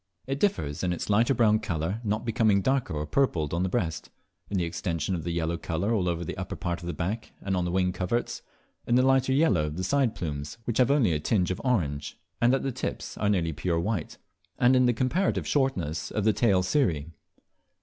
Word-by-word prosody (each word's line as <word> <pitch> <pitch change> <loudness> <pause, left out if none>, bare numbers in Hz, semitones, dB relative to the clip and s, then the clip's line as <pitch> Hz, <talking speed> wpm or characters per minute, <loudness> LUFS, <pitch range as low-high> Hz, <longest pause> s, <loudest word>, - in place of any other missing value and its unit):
It 135 +1 -3
differs 75 - 0
in 90 -1 +1
its 90 - -3
lighter 115 +6 +3
brown 110 -2 +4
colour, 95 0 -2
not 110 +1 -1
becoming 110 -3 +2
darker 130 - 0
or 75 0 -2
purpled 80 - 0
on 85 - 0
the 95 - 0
breast; 85 -7 -2 0.4
in 100 - -1
the 90 - +1
extension 85 +1 -2
of 85 -3 -3
the 85 - -3
yellow 85 0 -1
colour 90 +8 -1
all 95 -5 +1
over 85 0 -2
the - - -4
upper - - -4
part 85 -1 -3
of 85 - -7
the - - -1
back 100 +9 -4
and 95 -1 -2
on 90 -1 0
the 90 - -2
wing 90 0 +1
coverts; 105 +7 -2 0.5
in 120 - +3
the 130 - +5
lighter 135 0 +3
yellow 130 - +3
of 75 +2 -6
the 95 - -2
side 135 +2 +1
plumes, 75 -1 -5
which 120 0 -1
have 125 0 +5
only 140 - +3
a 75 - 0
tinge 90 +3 +1
of 90 - -4
orange, 75 - -1 0.2
and 120 +2 +5
at - - -2
the 135 - -1
tips - - -5
are 105 - +1
nearly 85 -5 +1
pure 85 +3 -1
white; 100 -1 -2 0.4
and 125 +2 +4
in 130 -1 +4
the 120 - +3
comparative 130 - 0
shortness 90 - 0
of 105 - -2
the 110 0 +4
tail 100 -6 +3
cirrhi. 85 - 0
95 Hz, 225 wpm, -27 LUFS, 85-120 Hz, 0.5 s, the